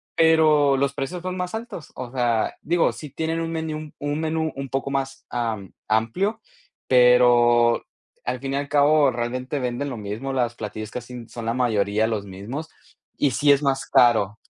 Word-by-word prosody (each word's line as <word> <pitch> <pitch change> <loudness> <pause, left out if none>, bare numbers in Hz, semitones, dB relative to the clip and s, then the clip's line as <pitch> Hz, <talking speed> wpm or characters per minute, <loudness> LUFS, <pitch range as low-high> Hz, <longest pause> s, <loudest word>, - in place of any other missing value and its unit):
pero 155 -4 +4
los 140 +1 0
precios 155 +6 -4
son 185 +1 -4
más 180 0 -3
altos, 220 -7 -7
o 125 -1 -6
sea, 120 -3 0
digo, 170 -1 +2
sí 150 -3 -9
tienen 160 +3 -2
un 165 0 -3
menú 155 -2 -4
un 145 +1 -2
menú 160 0 -1
un 135 0 -5
poco 135 +1 -2
más, 135 -1 -3
am, 110 -5 -3
amplio, 115 - 0 0.5
pero 120 -1 +5 0.4
al 125 +1 -2
fin 135 +1 -4
y - - 0
al 140 0 -3
cabo 145 -1 +4
realmente 125 +3 -3
venden 125 +2 -2
lo 125 - -5
mismo, 110 +6 -5
las 120 -2 0
platillos 110 -1 -6
casi 125 -1 -8
son 115 -1 -7
la 115 - 0
mayoría 110 -3 +1
los 110 -3 -2
mismos, 110 +12 -7 0.5
y 145 - +2
sí 145 +4 +3
es 140 0 +4
más 135 -1 0
caro. 110 -4 +4
135 Hz, 180 wpm, -23 LUFS, 120-150 Hz, 0.5 s, pero